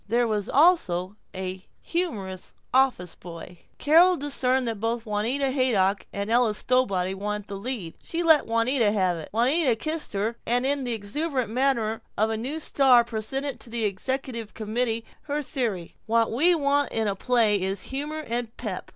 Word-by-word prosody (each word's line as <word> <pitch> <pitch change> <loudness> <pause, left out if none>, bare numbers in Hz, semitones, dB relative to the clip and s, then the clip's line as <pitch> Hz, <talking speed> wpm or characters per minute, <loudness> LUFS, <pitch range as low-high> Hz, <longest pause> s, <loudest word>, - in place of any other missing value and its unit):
There 235 +2 +2
was 210 -2 -2
also 210 - +3 0.2
a 185 0 -5 0.2
humorous 205 - -4 0.2
office 255 -10 +2
boy. 170 0 -11 0.2
Carol 345 +4 +5
discerned 265 -3 +1
that 225 -3 -3
both 230 +2 -2
Juanita 235 +6 0
Haydock 210 -8 +1
and 200 +2 -4
Ella 235 -2 +3
Stowbody 200 -8 +1
wanted 205 +1 -4
the 200 - -6
lead. 205 -6 -4
She 340 +1 -3
let 320 -3 +5
Juanita 230 0 +2
have 185 -4 +1
it. 160 - -8
Juanita 255 +4 +3
kissed 310 +5 -4
her 215 +4 -1
and 245 +2 0
in 280 -1 0
the 245 - -1
exuberant 250 +3 -2
manner 235 -3 0 0.2
of 220 +1 +2
a - - -1
new 260 +8 -4
star 265 -5 +4
presented 240 +4 -4
to 230 - -9
the 230 -1 -1
executive 230 +2 -3
committee 225 +1 -2 0.2
her 295 0 -2
theory, 220 - -2
"What 230 0 +2
we 330 +10 +4
want 285 -2 +1
in 225 -1 0
a 200 - 0
play 220 -2 +2
is 190 +1 -2
humor 295 +3 -4
and 235 0 -3
pep. 210 -6 -5
230 Hz, 170 wpm, -25 LUFS, 205-270 Hz, 0.2 s, Carol